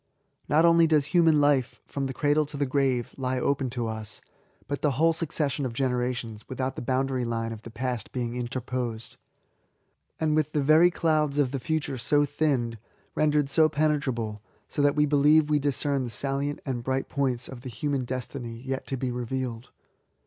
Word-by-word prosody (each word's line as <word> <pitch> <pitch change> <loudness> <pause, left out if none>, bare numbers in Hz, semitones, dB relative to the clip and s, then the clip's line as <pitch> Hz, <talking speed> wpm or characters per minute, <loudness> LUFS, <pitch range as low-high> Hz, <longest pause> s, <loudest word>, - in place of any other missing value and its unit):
Not 160 +3 +5
only 170 -1 +6
does 155 -3 +3
human 165 -3 +5
hfe^ 145 -4 +2
from 140 -1 -3
the 135 - -4
cradle 150 +1 +2
to 145 - -7
the 140 - +1
grave, 130 -3 0
lie 130 -1 -1
open 135 0 0
to 120 -1 -3
us, 110 -1 -5 0.5
but 145 - -3
the 145 -3 +2
whole 165 +5 +3
succes 155 -3 -1
sion 140 - -3
of 125 -3 -2
generations, 125 -3 -2
without 130 0 -3
the - - -5
boundary 130 +1 0
line 115 -1 -2
of 110 - -9
the 115 - -10
past 120 -1 -4
being 120 -2 -3
interposed; 120 -1 -4 1.0
and 155 -1 +1
with 155 -1 0
the 150 - +1
very 155 +5 +6
clouds 155 -4 +1
of 140 -4 +2
the 135 - -2
future 145 -3 -2
so 145 +4 +3
thinned, 135 -6 0 0.2
— - - -37
^rendered 150 -2 +2
so 155 +3 +4
penetrable, 135 -8 -1 0.3
as - - -13
that 145 0 +3
we 150 -1 +4
believe 150 +1 +4
we 150 - +4
discern 140 -1 0
the - - -5
salient 140 +5 -2
and 130 -4 -2
bright 130 +1 -1
points 130 -3 -1
of 130 -2 -9
the 130 - -7
human 135 +4 -2
destiny 125 -1 -5
yet 135 0 -3
to 135 - -2
be 130 0 -2
revealed. 125 -1 -4
135 Hz, 190 wpm, -27 LUFS, 125-150 Hz, 1.0 s, only